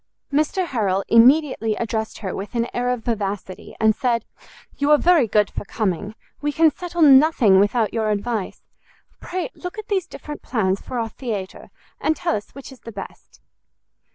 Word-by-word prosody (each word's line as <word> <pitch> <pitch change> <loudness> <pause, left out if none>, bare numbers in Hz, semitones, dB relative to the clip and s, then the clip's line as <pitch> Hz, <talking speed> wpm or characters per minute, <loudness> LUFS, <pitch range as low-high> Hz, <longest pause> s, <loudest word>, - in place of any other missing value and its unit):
Mr 310 +6 +1
Harrel 200 - 0
immediately 245 -2 +4
addressed 220 -1 -3
her 190 - -3
with 205 +5 -7
an 235 0 0
air 245 0 -1
of 250 -2 -2
vivacity, 200 -4 -4
and 220 -1 +3
said, 235 -2 0 0.5
"You 285 +1 +1
are 300 - +7
very 330 -6 +4
good 210 -1 +2
for - - -5
coming; 205 0 -3 0.3
we 295 0 0
can 320 +1 +4
settle 345 +2 -2
nothing 265 -8 +6
without 210 +1 +1
your 220 -2 0
advice: 210 0 -3 0.6
pray 370 +7 -4
look 360 +3 -8
at 430 0 -8
these 380 -4 0
different 300 -4 -9
plans 195 -5 -1
for 255 - -6
our 225 -1 -2
theatre, 215 -7 -6 0.3
and 315 - +1
tell 340 +2 -1
us 205 - -6
which 275 0 -10
is 265 - -14
the 230 - -10
best." 200 -2 -11
235 Hz, 175 wpm, -22 LUFS, 210-295 Hz, 0.6 s, are